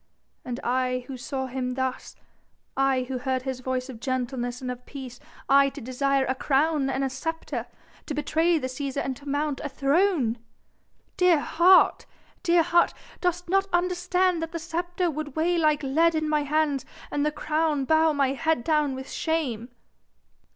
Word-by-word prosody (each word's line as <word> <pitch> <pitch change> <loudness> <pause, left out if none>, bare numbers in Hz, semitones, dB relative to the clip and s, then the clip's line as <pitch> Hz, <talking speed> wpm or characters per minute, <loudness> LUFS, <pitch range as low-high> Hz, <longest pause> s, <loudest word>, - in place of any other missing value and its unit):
And 245 0 -5
I 255 0 0
who 270 - -7
saw 265 +1 -4
Him 255 -1 -3
thus, 260 0 -3 0.6
I 270 -1 +2
who 255 0 -4
heard 260 0 -1
His 260 -1 -4
voice 255 0 -2
of 255 -4 -9
gentleness 245 -1 -2
and 255 -1 -4
of 250 0 -8
peace, 260 -4 -8 0.3
I 275 0 +5
to 285 - -10
desire 270 +2 0
a 260 - 0
crown 280 +1 +1
and 270 0 0
sceptre, 325 +5 -4 0.4
to 300 - -3
betray 320 +3 +2
the 290 - -3
Cæsar 270 +2 -3
and 265 - -2
to 285 0 -9
mount 290 0 -1
a 290 - -3
throne!!! 275 - +1 0.8
Dear 360 -4 +5
heart! 350 +5 +4 0.3
dear 340 -1 +4
heart! 345 +1 +3 0.2
dost 355 -1 -1
not 390 +2 +2
understand 360 0 +1
that 325 +1 -5
the - - -2
sceptre 345 +2 -2
would 300 -2 -6
weigh 340 +2 +1
like 305 -2 +2
lead 320 +5 +3
in 310 0 0
my 300 -1 +1
hands 290 -2 +1 0.3
and 290 - 0
the 300 - +1
crown 305 -1 0
bow 315 +2 +4
my 280 -3 +2
head 315 -1 0
down 300 -2 +1
with 265 +1 -7
shame?" 265 -8 -2
285 Hz, 170 wpm, -26 LUFS, 260-325 Hz, 0.8 s, I